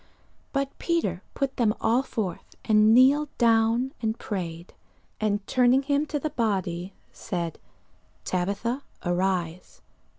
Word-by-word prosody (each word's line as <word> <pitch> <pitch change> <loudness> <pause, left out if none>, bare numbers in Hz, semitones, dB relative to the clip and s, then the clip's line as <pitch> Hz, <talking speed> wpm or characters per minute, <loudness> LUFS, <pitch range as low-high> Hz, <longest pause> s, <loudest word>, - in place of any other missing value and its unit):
But 275 -1 -2
Peter 265 - 0
put 275 -1 -2
them 220 -3 +2
all 230 +3 +3
forth, 210 -9 -5
and 215 0 +5
kneeled 270 +5 +5
down, 230 +2 +3
and 220 0 -1
prayed; 170 -4 -5 0.5
and 205 -2 0
turning 255 +2 +3
him 285 +2 +1
to 295 - -2
the 310 +2 -3
body 195 - -2 0.2
said, 170 -3 -4 0.7
Tabitha, 200 +8 -1 0.2
arise. 175 -1 -2
220 Hz, 120 wpm, -26 LUFS, 185-260 Hz, 0.7 s, and